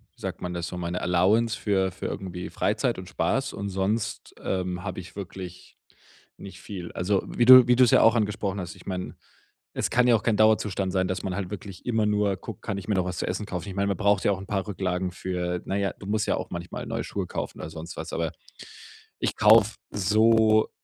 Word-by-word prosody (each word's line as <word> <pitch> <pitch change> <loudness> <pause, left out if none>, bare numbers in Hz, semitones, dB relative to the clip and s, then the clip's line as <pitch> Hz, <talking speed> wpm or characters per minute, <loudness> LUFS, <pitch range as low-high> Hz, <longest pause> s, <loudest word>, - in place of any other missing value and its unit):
wie - - -21
sagt - - -5
man 90 0 -4
das 85 -1 -3
so: 90 - -6
„Meine 90 +1 -3
Allowance", 105 +6 +2
für 95 -3 +1
für - - -8
irgendwie 90 -2 -5
Freizeit - - 0
und - - -8
Spaß - - 0
und 100 - -5
sonst, 100 +4 -2
ähm, 90 -1 -2
habe 95 -2 -5
ich 95 +2 -14
wirklich 95 -2 -8 0.6
nicht 100 - -11
viel. 90 -4 -7
Also 95 +2 +1
wie 120 - 0
du 130 -1 +10
wie 125 - +5
du's 125 -2 +5
ja - - +6
auch 115 +1 +6
angesprochen 105 -3 -1
hast, 90 - -7
ich - - -17
meine, 90 -1 -4 0.6
es - - -1
kann 125 +1 +3
ja 120 - +6
auch 110 - -1
kein 110 -3 +1
Dauerzustand 105 -3 +2
sein, 95 -1 +1
dass 95 - -2
man 95 -2 -3
halt 95 -3 -3
wirklich 95 -2 -8
immer 110 -3 +1
nur 105 -2 +1
guckt: - - -9
„Kann 100 - -3
ich 100 - -7
mir 105 - +1
noch 95 -1 +1
was 90 -1 -4
zu - - -2
essen 95 +3 -2
kaufen?“ 95 -1 -5
Ich 95 - -6
meine, 100 0 +1
man 100 -3 0
braucht 100 -1 +2
ja - - +3
auch 95 - -2
'n 95 - -9
paar 95 -2 -1
Rücklagen 95 -2 -2
für 90 -1 -3
na, 95 - -2
ja, 100 -1 0
du 100 - -10
musst 105 +1 0
ja - - +2
auch - - -5
manchmal 85 0 -6
neue - - -3
Schuhe - - -4
kaufen - - -5
oder 75 - -6
sonst 80 +1 -8
was, 80 +1 -6
aber 80 -2 -1 0.9
ich - - -1
kaufe 110 0 +6 0.2
so 110 +2 +4
95 Hz, 235 wpm, -26 LUFS, 90-105 Hz, 0.9 s, du